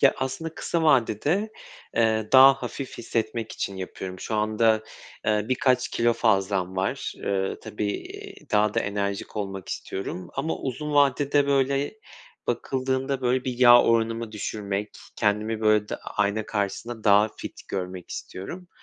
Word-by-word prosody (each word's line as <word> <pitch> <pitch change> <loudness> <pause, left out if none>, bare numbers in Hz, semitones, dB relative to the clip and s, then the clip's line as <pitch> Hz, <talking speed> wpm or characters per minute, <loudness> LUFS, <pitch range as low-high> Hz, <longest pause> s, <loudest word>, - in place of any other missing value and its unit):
Ya, 140 - +5
aslında 130 +5 -3
kısa 170 -1 -1
vadede, 150 - +2 0.4
eee, 110 -1 +2
daha 135 +1 +9
hafif 130 +2 -6
hissetmek 115 -1 -2
için 100 - -4
yapıyorum. 95 0 -6
Şu 110 - -4
anda, 110 +1 +2 0.4
eee, 105 -1 +2
birkaç 130 -1 +2
kilo 120 0 +2
fazlam 95 -5 +1
var. 95 +1 -1
Iıı, 95 -1 -2
tabii, 105 - -4
iii, - - -9
daha 105 0 +3
da - - +2
enerjik 100 0 -3
olmak 95 -2 -4
istiyorum 90 -2 -5
ama 155 +4 -1
uzun 150 +3 -4
vadede, 145 0 +3
böyle, 140 +3 +1 0.5
bakıldığında, 130 +2 -1
böyle, 125 0 +1
bir 125 -2 -3
yağ 120 -1 +8
oranımı 115 -1 +1
düşürmek, 105 -1 -3 0.3
kendimi, 110 +1 0
böyle, 110 -1 +3
da - - -3
ayna 105 +1 -1
karşısında 110 +2 -3
daha 105 +1 +6
fit - - -8
görmek 90 -2 -5
istiyorum. 175 - -7
110 Hz, 140 wpm, -25 LUFS, 105-130 Hz, 0.5 s, daha